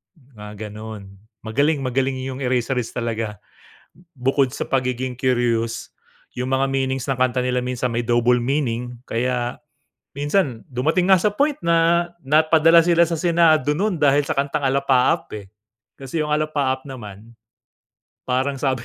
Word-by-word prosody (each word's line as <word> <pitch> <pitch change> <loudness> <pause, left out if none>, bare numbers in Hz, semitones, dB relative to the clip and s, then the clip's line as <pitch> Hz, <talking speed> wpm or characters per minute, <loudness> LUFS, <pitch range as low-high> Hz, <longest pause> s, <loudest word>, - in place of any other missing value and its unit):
Mga 105 - -10
ganun, 105 -2 -9 0.2
magaling 140 +6 0
magaling 130 +1 0
yung 130 0 -5
Eraserheads 125 -1 -1
talaga. 115 -3 -4 0.7
Bukod 135 -1 0
sa - - -5
pagiging 125 -1 -1
curious, 120 -3 -1 0.4
yung 125 +1 -3
mga 135 +1 +2
meanings 135 -1 -2
ng 135 - 0
kanta 130 0 +1
nila 125 0 0
minsan 125 0 -2
may 115 0 -2
double 120 +1 +2
meaning 125 -3 -2
kaya 120 +1 -1 0.6
minsan 145 - 0
dumating 160 +9 +1
nga 185 - +6
sa 210 - +3
point 280 +8 0
na 170 0 +2 0.2
napadala 160 +3 +5
sila 170 0 +4
sa 165 -1 -3
senado 160 -4 +3
nun 190 -2 -1
dahil 145 0 +4
sa - - -2
kantang 140 +1 -1
"Alapaap", 135 -1 +2
eh. 100 -1 -11 0.5
Kasi 150 +4 -3
yung 150 - -2
"Alapaap" 145 -3 -1
naman 115 -2 -10 0.9
parang 130 +2 -1
sabi 130 -3 -1
130 Hz, 140 wpm, -21 LUFS, 120-150 Hz, 0.9 s, nga